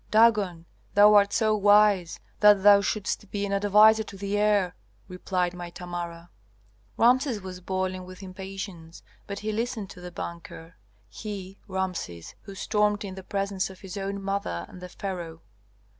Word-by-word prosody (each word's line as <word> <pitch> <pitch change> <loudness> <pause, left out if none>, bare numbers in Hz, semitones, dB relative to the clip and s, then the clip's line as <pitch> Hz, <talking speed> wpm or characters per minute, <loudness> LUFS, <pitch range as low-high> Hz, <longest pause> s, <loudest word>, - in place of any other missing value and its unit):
'Dagon, 210 -6 +3 0.3
thou 205 +1 +7
art 200 -1 +5
so 215 -1 +2
wise 205 -3 +4 0.2
that 205 -2 +6
thou 200 -1 +8
shouldst 205 0 -2
be 205 -1 -2
an 200 - -3
adviser 210 +2 +5
to 200 -2 -8
the 200 +1 -3
heir,' 205 -3 +2 0.3
replied 180 -1 -2
my 175 -1 -7
Tamara." 175 -1 -7 0.7
Rameses 250 0 +3
was 185 -1 -8
boiling 185 0 -2
with 185 +1 -11
impatience, 190 -3 -8 0.2
but 200 - -5
he 215 - 0
listened 225 -2 -3
to 180 - -12
the 180 - -7
banker, 170 -1 -8 0.3
he, 195 - -8
Rameses, 185 - -4
who 195 -1 -11
stormed 210 0 0
in 190 - -6
the 190 - -8
presence 195 0 -2
of 190 -1 -13
his 190 -2 -8
own 200 0 -3
mother 195 - -3
and 180 - -13
the 180 - -8
pharaoh. 170 -4 -6
195 Hz, 160 wpm, -26 LUFS, 180-205 Hz, 0.7 s, thou